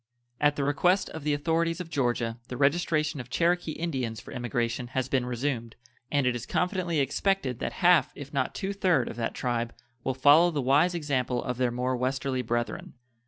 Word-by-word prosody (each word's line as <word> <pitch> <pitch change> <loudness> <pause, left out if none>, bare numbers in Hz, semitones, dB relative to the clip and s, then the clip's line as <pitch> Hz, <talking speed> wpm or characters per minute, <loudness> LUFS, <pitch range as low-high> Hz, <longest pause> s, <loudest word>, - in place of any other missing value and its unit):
At 145 0 +3
the 145 - -1
request 175 +7 +2
of 160 - -7
the 150 -1 +1
authorities 165 +3 0
of 170 -2 -7
Georgia 120 -3 0
the 125 - -6
registration 155 +1 +1
of 125 -1 -7
Cherokee 170 +2 +1
Indians 130 -10 -3
for - - -12
emigration 120 -1 -2
has 130 -1 +1
been 130 -2 0
resumed, 120 -2 -2 0.4
and 140 -2 +2
it 125 -1 +2
is 120 - -5
confidently 180 -3 0
expected 140 - 0
that - - -3
half, 175 -2 +5
if 145 0 -9
not 130 -2 -1
two 195 +1 -2
third, 180 - +2
of - - -7
that 115 -1 -2
tribe 120 -2 -2 0.3
will 130 - -1
follow 145 +6 +6
the 155 -4 -2
wise 145 +7 +3
example 130 -6 -1
of 125 -1 -3
their 125 -1 +2
more 125 +2 -1
westerly 130 +1 -1
brethren. 120 +2 -3
140 Hz, 190 wpm, -28 LUFS, 125-165 Hz, 0.4 s, follow